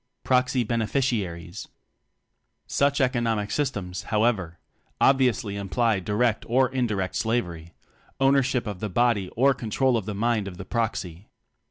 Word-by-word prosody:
Proxy 125 Hz, 0 st, +2 dB
Beneficiaries. 110 Hz, -7 st, -2 dB, 1.0 s
Such 140 Hz, +1 st, +1 dB
economic 115 Hz, -5 st, 0 dB
systems, 105 Hz, -11 st, -2 dB
however, 105 Hz, -6 st, +1 dB, 0.4 s
obviously 130 Hz, -6 st, +2 dB
imply 100 Hz, +2 st, 0 dB
direct 105 Hz, +4 st, 0 dB
or 130 Hz, +2 st, +3 dB
indirect 110 Hz, -8 st, -1 dB
slavery 85 Hz, -8 st, -2 dB, 0.4 s
ownership 135 Hz, -2 st, +2 dB
of 105 Hz, -4 st, -5 dB
the 105 Hz, -, -3 dB
body 105 Hz, -2 st, +1 dB
or 135 Hz, +4 st, +4 dB
control 125 Hz, +2 st, 0 dB
of 110 Hz, -3 st, -2 dB
the 105 Hz, -, -3 dB
mind 110 Hz, -1 st, 0 dB
of 90 Hz, -2 st, -8 dB
the 95 Hz, -, -8 dB
proxy. 100 Hz, -5 st, -3 dB
115 Hz, 125 wpm, -25 LUFS, 100-125 Hz, 1.0 s, or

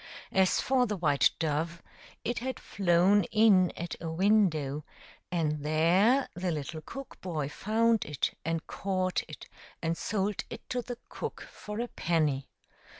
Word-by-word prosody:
As 190 Hz, -1 st, +3 dB
for 255 Hz, -1 st, +2 dB
the 210 Hz, -1 st, -2 dB
white 145 Hz, -5 st, +4 dB
dove, 165 Hz, +2 st, -1 dB, 0.4 s
it 240 Hz, -, -1 dB
had 260 Hz, 0 st, -4 dB
flown 190 Hz, +2 st, +3 dB
in 205 Hz, -4 st, +5 dB
at 170 Hz, 0 st, -4 dB
a 165 Hz, -, -3 dB
window, 160 Hz, -6 st, +2 dB, 0.5 s
and 150 Hz, -4 st, 0 dB
there 180 Hz, -, +4 dB
the 180 Hz, 0 st, -2 dB
little 155 Hz, 0 st, -4 dB
cook 270 Hz, -, -9 dB
boy 160 Hz, -6 st, -2 dB
found 220 Hz, +7 st, +1 dB
it, 145 Hz, -4 st, -2 dB
and 165 Hz, 0 st, -2 dB
caught 185 Hz, -2 st, -1 dB
it 155 Hz, -, -10 dB, 0.3 s
and 165 Hz, 0 st, -1 dB
sold 205 Hz, +2 st, -1 dB
it -, -, -9 dB
to 250 Hz, -, 0 dB
the 245 Hz, 0 st, -6 dB
cook -, -, -6 dB
for 210 Hz, +1 st, -7 dB
a 240 Hz, -, -1 dB
penny. 155 Hz, -, 0 dB
180 Hz, 150 wpm, -30 LUFS, 160-210 Hz, 0.5 s, in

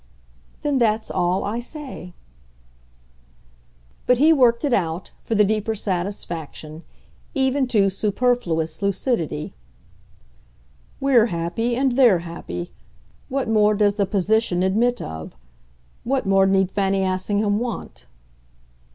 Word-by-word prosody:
"Then 285 Hz, -2 st, +1 dB
that's 220 Hz, -2 st, +1 dB
all 180 Hz, +2 st, 0 dB
I 215 Hz, +4 st, -2 dB
say." 255 Hz, -, -9 dB, 1.9 s
But 250 Hz, -, +4 dB
he 310 Hz, +5 st, +5 dB
worked 245 Hz, -2 st, +3 dB
it 280 Hz, -, +1 dB
out, 170 Hz, -3 st, -1 dB
for 225 Hz, -, -2 dB
the 210 Hz, -, +5 dB
deeper 215 Hz, +1 st, 0 dB
satisfaction, 175 Hz, -5 st, -4 dB, 0.5 s
even 265 Hz, 0 st, +1 dB
to 210 Hz, -5 st, +3 dB
superfluous 195 Hz, -7 st, 0 dB
lucidity. 195 Hz, -, -1 dB, 1.5 s
"We're 255 Hz, -4 st, +4 dB
happy, 195 Hz, +7 st, -2 dB
and 265 Hz, +1 st, +1 dB
they're 235 Hz, -9 st, +4 dB
happy. 170 Hz, +1 st, -6 dB, 0.6 s
What 270 Hz, 0 st, -1 dB
more 215 Hz, -1 st, +3 dB
does 205 Hz, 0 st, +2 dB
the 200 Hz, -2 st, +1 dB
position 200 Hz, -2 st, +1 dB
admit 235 Hz, +6 st, +1 dB
of? 80 Hz, -3 st, -8 dB, 0.7 s
What 265 Hz, +2 st, -1 dB
more 195 Hz, 0 st, +4 dB
need 190 Hz, -1 st, +2 dB
Fanny 195 Hz, -1 st, 0 dB
Assingham 205 Hz, +3 st, 0 dB
want?" 240 Hz, -2 st, -6 dB
210 Hz, 115 wpm, -22 LUFS, 185-245 Hz, 1.9 s, he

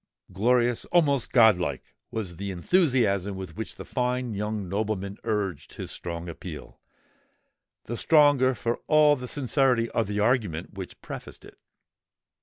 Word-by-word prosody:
Glorious—almost 125 Hz, -, +2 dB
god 110 Hz, -6 st, +6 dB
like, 90 Hz, -, -4 dB, 0.2 s
was 95 Hz, -7 st, -5 dB
the 100 Hz, +2 st, -4 dB
enthusiasm 100 Hz, -, +1 dB
with 95 Hz, -4 st, -7 dB
which 110 Hz, -, -5 dB
the -, -, -9 dB
fine 125 Hz, -2 st, -1 dB
young 105 Hz, -1 st, -3 dB
nobleman 100 Hz, 0 st, -3 dB
urged 105 Hz, -8 st, -2 dB
his -, -, -7 dB
strong 85 Hz, 0 st, -6 dB
appeal—the 85 Hz, -, -12 dB
stronger 145 Hz, -4 st, +4 dB
for 115 Hz, +2 st, -2 dB
all 150 Hz, -1 st, +5 dB
the 125 Hz, -2 st, -7 dB
sincerity 125 Hz, -3 st, +1 dB
of 115 Hz, -3 st, 0 dB
the 105 Hz, +1 st, -2 dB
argument 105 Hz, -8 st, 0 dB
which 95 Hz, -2 st, -8 dB
prefaced -, -, -9 dB
it. -, -, -13 dB
110 Hz, 130 wpm, -26 LUFS, 95-125 Hz, 0.2 s, god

